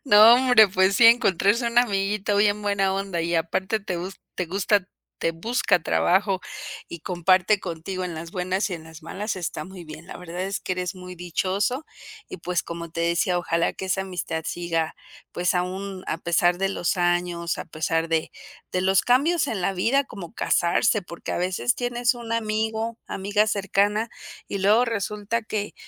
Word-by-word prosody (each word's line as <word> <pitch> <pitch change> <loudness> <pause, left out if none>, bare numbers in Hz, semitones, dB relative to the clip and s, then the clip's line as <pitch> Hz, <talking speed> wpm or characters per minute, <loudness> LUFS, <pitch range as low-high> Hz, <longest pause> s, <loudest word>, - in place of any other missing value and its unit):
No, 220 -1 +8
hombre, 245 -5 +6
pues 190 +1 +2
sí, 235 - +7
encontrarse 230 0 +4
un 235 +1 +2
amiguito 205 -2 +1
bien 205 0 +2
buena 195 -2 +1
onda, 195 -3 -2
y 170 +1 -1
aparte 190 +6 0
te 185 -2 -4
gus 185 +3 -6
te 180 - -2
gusta 195 +1 +1 0.3
te 165 - +1
busca 180 0 +1
trabajo 190 +2 +2 0.5
y 170 - -8
comparte 185 +4 +2
contigo 185 +1 -5
en 175 -2 -4
las 165 +1 -7
buenas 185 +3 -1
y 180 - -3
en 160 -1 -9
las 160 0 -13
malas, 205 +6 -4
está 175 - -4
muy 185 -1 -10
bien, 155 +1 -11
la - - -9
verdad 180 +1 -6
es 195 +1 -3
que 185 - -3
eres 180 +1 -3
muy 180 0 -9
dichoso, 190 - -1 0.4
y - - -7
pues 175 0 -2
como 170 -1 -7
te 165 - -4
decía, 170 +1 +1
ojalá 170 -1 0
que 190 - -6
esa 190 +1 0
amistad 170 -4 -4
siga, 165 -2 -2 0.4
pues 180 +1 0
aún 185 +1 -3
a 165 - -2
pesar 175 +1 +2
de 195 0 +1
los 180 -1 -1
años, 175 -1 0
a - - -4
pesar 165 +1 -1
de 160 -1 0 0.4
de 185 - 0
los 190 0 +4
cambios 290 +6 +2
en 195 -5 -2
la 195 - +1
vida, 255 +9 +2
como 195 -9 -10
casarse, 210 +6 +2
porque 170 -2 -7
a - - -1
veces 185 +7 0
tienes 245 0 0
un 235 -1 -9
amigo, 220 +1 -1
amiga 205 +2 0
cercana 205 +2 +1 0.4
y 200 - -3
luego 210 +5 +4
resulta 210 0 -2
que 210 -1 -4
190 Hz, 185 wpm, -24 LUFS, 175-210 Hz, 0.5 s, No